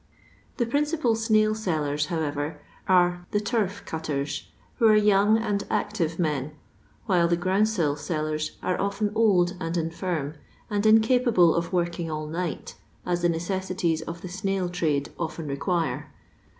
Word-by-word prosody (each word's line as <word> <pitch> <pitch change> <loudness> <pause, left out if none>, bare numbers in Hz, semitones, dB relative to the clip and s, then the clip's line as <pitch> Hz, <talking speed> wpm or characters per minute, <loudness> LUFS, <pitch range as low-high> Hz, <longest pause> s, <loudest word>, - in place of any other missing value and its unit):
The 240 - +1
principal 290 0 +1
tttail 215 -1 +3
selUrs, 155 -8 -1
however, 150 -2 -2 0.3
are 175 -1 +3
the 210 - +1
turf 205 -2 -1
cutters, 150 -3 -3 0.3
who 230 - +5
are 215 - +6
young 210 0 +4
and 210 -3 -1
active 170 -6 -1
men, 150 -4 -1 0.5
while 180 -5 +3
the 170 0 +2
groundsel 185 -4 +1
sellers 155 0 -3
are 185 - 0
often 200 +1 -1
old 195 -5 +3
and 165 -1 -3
infinn 165 -2 -2 0.3
and 205 +1 +1
incapable 220 -5 +5
of 170 0 -1
working 175 -2 -1
all 155 -1 -3
night, 165 +2 -4 0.3
aa 180 - 0
the 175 0 +1
neoesdtiei 175 -1 -1
of 170 0 -6
the - - -4
snail 190 0 -1
trade 155 -5 0
often 165 -1 -4
require. 165 +4 -2
175 Hz, 140 wpm, -26 LUFS, 160-205 Hz, 0.5 s, are